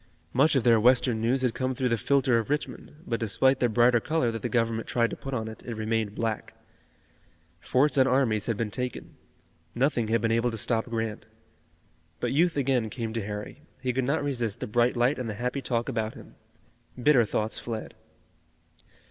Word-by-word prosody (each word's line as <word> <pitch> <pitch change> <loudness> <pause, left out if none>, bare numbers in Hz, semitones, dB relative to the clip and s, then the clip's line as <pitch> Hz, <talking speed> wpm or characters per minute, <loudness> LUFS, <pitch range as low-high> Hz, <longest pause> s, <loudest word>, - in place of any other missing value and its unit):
Much 140 +4 +4
of 130 - +2
their 115 -1 +5
Western 120 0 +3
news 125 +3 +1
had 125 -3 +1
come 130 0 -2
through 130 -1 0
the 115 - +2
filter 130 +2 +2
of 115 - -5
Richmond, 150 +1 -4
but 115 -6 -2
despite 130 +4 +2
the 120 - +2
brighter 120 +1 +4
color 135 -2 0
that 115 -1 -5
the - - -2
Government 115 -2 0
tried 115 -1 +1
to - - -4
put 135 - -7
on 115 -4 -2
it, 110 - -9
it 120 - -5
remained 110 -1 -2
black. 110 -2 -3 1.0
Forts 140 - +2
and 130 - +5
armies 120 -5 +1
had 115 -3 -1
been 110 -1 -2
taken. 125 +2 -5 0.6
Nothing 125 -2 +1
had 115 +1 +2
been 115 0 0
able 115 +2 +2
to 115 - -5
stop 110 +1 0
Grant. 115 -2 -4 0.9
But - - -1
youth 165 +2 +2
again 130 -5 +1
came 115 -1 -4
to 115 -2 -2
Harry. 105 +7 -6 0.2
He 125 -2 -2
could 130 +1 0
not 145 +3 0
resist 120 -7 -2
the - - -3
bright 120 +3 +1
light 125 +4 +2
and 120 -3 -3
the 105 - -4
happy 125 +5 -2
talk 120 -2 -1
about 110 -1 -2
him. - - -13 0.7
Bitter 125 -1 +5
thoughts 110 0 -2
fled. 115 -2 -6
120 Hz, 200 wpm, -27 LUFS, 110-130 Hz, 1.0 s, their